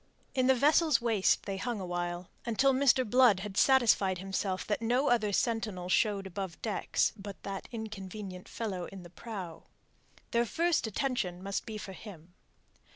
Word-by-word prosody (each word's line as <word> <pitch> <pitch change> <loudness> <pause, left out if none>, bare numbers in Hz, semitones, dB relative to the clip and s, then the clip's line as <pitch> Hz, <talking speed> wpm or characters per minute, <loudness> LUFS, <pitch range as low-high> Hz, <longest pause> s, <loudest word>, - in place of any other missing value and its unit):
In 255 -1 +2
the 265 - +5
vessel's 300 +1 +4
waist 225 -5 +2
they 195 -1 -3
hung 235 +2 -3
awhile, 175 -1 -4
until 265 +4 +2
Mr. 260 -2 +3
Blood 235 -4 +5
had 200 -1 -6
satisfied 220 -7 +4
himself 190 0 -2
that 210 - -1
no 245 +5 +2
other 220 -4 +2
sentinel 210 -5 -1
showed 200 0 +2
above 190 -2 -5
decks 215 -3 0
but 200 -2 -9
that 195 -1 -5
inconvenient 200 -4 -7
fellow 200 -5 -4
in 195 -2 -10
the 175 - -13
prow. 185 -6 -8 0.7
Their 235 0 +2
first 335 -4 +1
attention 210 -6 -2
must 200 0 -3
be 220 -1 -5
for 195 -2 -7
him. 180 -4 -12
210 Hz, 155 wpm, -31 LUFS, 190-240 Hz, 0.7 s, the